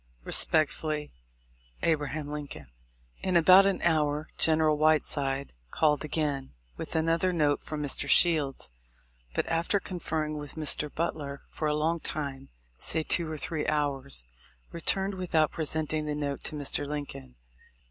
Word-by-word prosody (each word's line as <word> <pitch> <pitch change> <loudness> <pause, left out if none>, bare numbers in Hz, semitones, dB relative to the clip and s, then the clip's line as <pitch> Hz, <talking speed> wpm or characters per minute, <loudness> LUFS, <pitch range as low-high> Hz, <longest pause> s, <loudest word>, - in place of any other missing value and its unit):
Respecefully, 155 - +2 0.7
A. 165 - +4
Lincoln. 145 - -6 0.5
In 185 -2 +2
about 185 +4 +7
an 195 - -1
hour, 155 -2 +1
General 155 -1 +4
Whiteside 145 -3 +1 0.2
called 150 - +2
again 145 - -2 0.2
with - - -6
another 165 +3 +2
note 150 -4 +1
from 150 -1 -5
Mr. 145 - -1
Shields; 150 - +3 0.6
but - - 0
after 170 +5 +1
con 185 -2 -6
ferring 155 -2 -2
with 145 -1 -8
Mr. 150 -1 -1
Butler 145 -4 -4
for 155 - -3
a 150 - +1
long 160 +2 0
time, 140 -4 -5 0.3
say 160 - +2
two 160 0 +1
or 155 - -4
three 155 0 -3
hours, 140 - 0 0.5
returned 195 +4 +2
without 170 -5 +1
presenting 155 -1 -2
the 150 - -2
note 145 -1 -3
to - - -2
Mr. 145 -1 -2
Lincoln. 140 - -6
155 Hz, 135 wpm, -28 LUFS, 145-160 Hz, 0.7 s, about